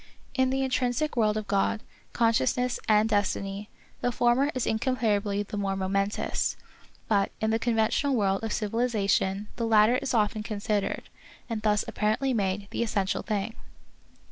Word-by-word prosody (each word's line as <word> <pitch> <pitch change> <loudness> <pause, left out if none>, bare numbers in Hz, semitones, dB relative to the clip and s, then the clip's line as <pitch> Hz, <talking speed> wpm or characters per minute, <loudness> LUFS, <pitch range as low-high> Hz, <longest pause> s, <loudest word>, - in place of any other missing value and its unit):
In 260 -1 +2
the 270 +1 0
intrinsic 255 +3 0
world 215 -2 +2
of 215 - -3
God, 200 +2 0 0.3
conscious 230 - +2
ness 250 0 0
and 215 0 +5
destiny, 205 -1 -1 0.3
the 245 - +1
former 245 +4 +2
is 255 - 0
incomparably 220 -4 0
the 205 0 -6
more 195 -1 -1
momentous; 195 +2 -1 0.5
but 200 -2 +2
in 220 0 +1
the 225 - +1
conventional 235 +4 +1
world 195 -2 +1
of 225 - -1
civiliza 225 -1 0
tion 195 +1 +1
the 230 -1 -1
latter 220 +2 +5
is 255 - -2
often 215 0 +1
considered, 210 -1 -2 0.4
and 225 -2 -3
thus 210 -1 +2
apparently 220 +6 0
made, 200 -2 -1
the - - -2
essential 205 -4 0
thing. 210 0 -2
215 Hz, 155 wpm, -27 LUFS, 205-240 Hz, 0.5 s, and